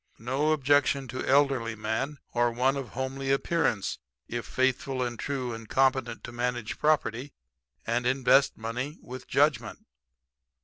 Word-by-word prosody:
No 135 +6 0
objection 145 -2 +2
to 130 - -4
elderly 135 -5 +3
man 110 +7 -2 0.2
or 120 0 +3
one 130 +3 +1
of 135 -3 -4
homely 130 +2 -4
appearance 135 - 0 0.3
if 120 0 -4
faithful 130 0 0
and 120 -2 -4
true 130 -4 -3
and 115 -1 -9
competent 130 -2 +1
to - - -7
manage 120 -1 -3
property 145 -3 +1 0.5
and 120 +2 0
invest 130 +1 +3
money 125 +7 -4
with 125 0 -9
judgment. 140 -6 +1
130 Hz, 135 wpm, -28 LUFS, 120-135 Hz, 0.5 s, elderly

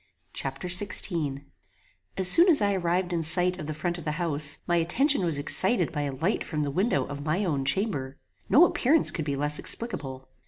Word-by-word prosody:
Chapter 135 +6 -6
XVI 175 -6 +3 0.7
As 190 - +5
soon 340 - +7
as 315 - +5
I 200 -1 0
arrived 180 0 -2
in 170 - -2
sight 180 +3 0
of 150 - -8
the 155 - -5
front 175 +3 -4
of - - -11
the 150 - -4
house, 155 -3 +1
my 175 -1 -1
attention 230 - +1
was 165 -4 -2
excited 180 +5 +1
by 150 - -4
a 145 -1 -4
light 165 +10 -2
from 150 -3 -4
the 145 - -4
window 195 - -1
of 145 0 -9
my 170 +7 -2
own 140 -6 -3
chamber. 140 -7 -3 0.3
No 315 +7 +5
appearance 305 -1 +2
could 155 - -6
be 140 -2 -3
less 150 +2 -1
explicable. 135 - -5
170 Hz, 200 wpm, -25 LUFS, 145-190 Hz, 0.7 s, soon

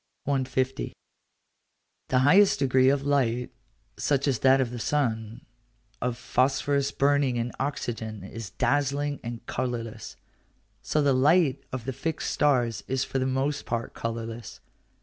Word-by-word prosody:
150. 130 -1 -1 1.1
The 130 - +1
highest 195 +6 +6
degree 130 -1 +4
of 140 0 +1
light, 125 -4 +1 0.5
such 140 0 +1
as 130 -5 +1
that 135 +2 +5
of 125 -3 0
the 120 - -5
sun, 115 -5 -1 0.6
of 125 -1 -1
phosphorus 140 +3 +1
burning 140 -2 +2
in 120 +1 -2
oxygen, 115 -6 -3
is 110 +1 -7
dazzling 145 +5 0
and 120 -1 -6
colourless: 120 -3 -4 0.7
so 150 - 0
the 140 -1 +4
light 140 0 +3
of 130 -3 -5
the 135 - -3
fixed 155 +5 -3
stars 120 -7 +1
is 130 0 0
for 135 - -2
the 130 - 0
most 135 +2 -1
part 115 -1 -3
colourless. 115 0 -5
130 Hz, 135 wpm, -27 LUFS, 120-140 Hz, 1.1 s, highest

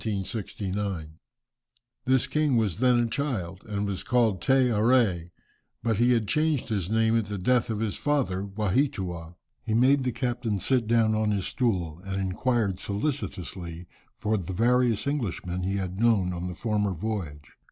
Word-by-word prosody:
This 130 0 +3
king 145 -1 +1
was 105 -5 0
then 125 -1 +4
a - - +2
child, 110 -9 -3
and 105 -1 -2
was 100 -2 -3
called 115 -7 +1
Te 130 0 +3
Arée, 105 -6 +2 0.5
but 115 -3 +1
he 120 +2 +4
had 115 -3 +1
changed 150 -3 +1
his 100 -5 -1
name 110 +1 +2
at 115 -3 +1
the 105 0 -4
death 120 +6 +2
of 110 -1 -2
his 110 -2 -1
father 130 -11 0
Waheatua. 95 - -1 0.3
He 110 -3 -1
made 130 +3 +4
the 125 - 0
captain 120 -3 -2
sit 125 +1 +1
down 115 -1 +3
on 110 0 +1
his 100 -3 0
stool, 90 - -1
and 95 0 -3
inquired 100 +1 0
solicitously 95 - -4 0.3
for 110 0 0
the 95 0 -5
various 120 +1 +2
Englishmen 95 - -2
he 95 +2 -1
had 95 -1 -3
known 105 -6 +3
on 90 +1 -4
the 90 - -5
former 105 -2 0
voyage. 80 -7 -5
110 Hz, 160 wpm, -27 LUFS, 95-125 Hz, 0.5 s, then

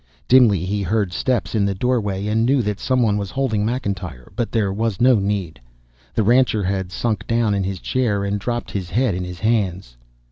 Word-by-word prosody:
Dimly 115 -9 +5
he 100 +2 -1
heard 100 -1 0
steps 105 -5 -1
in 110 -3 +2
the 100 -1 0
doorway 105 -3 -1
and 110 +2 +1
knew 130 +1 +2
that 105 -1 -2
some 130 -1 +1
one 105 -2 +2
was 100 -2 -4
holding 130 -6 -1
McIntyre, 100 - -4
but 115 +1 -2
there 105 -4 0
was 110 -2 -2
no 125 -1 +5
need. 95 -9 -2 0.5
The 110 - +2
rancher 120 -1 +3
had 95 -1 -2
sunk 110 +1 -2
down 115 -2 +1
in 100 -1 0
his 95 -1 -3
chair, 110 -5 0
and 100 +1 -1
dropped 120 +3 -3
his 95 -4 -4
head 120 0 +1
in 90 +1 -3
his 90 -1 -8
hands. 95 - -1
105 Hz, 205 wpm, -21 LUFS, 95-115 Hz, 0.5 s, Dimly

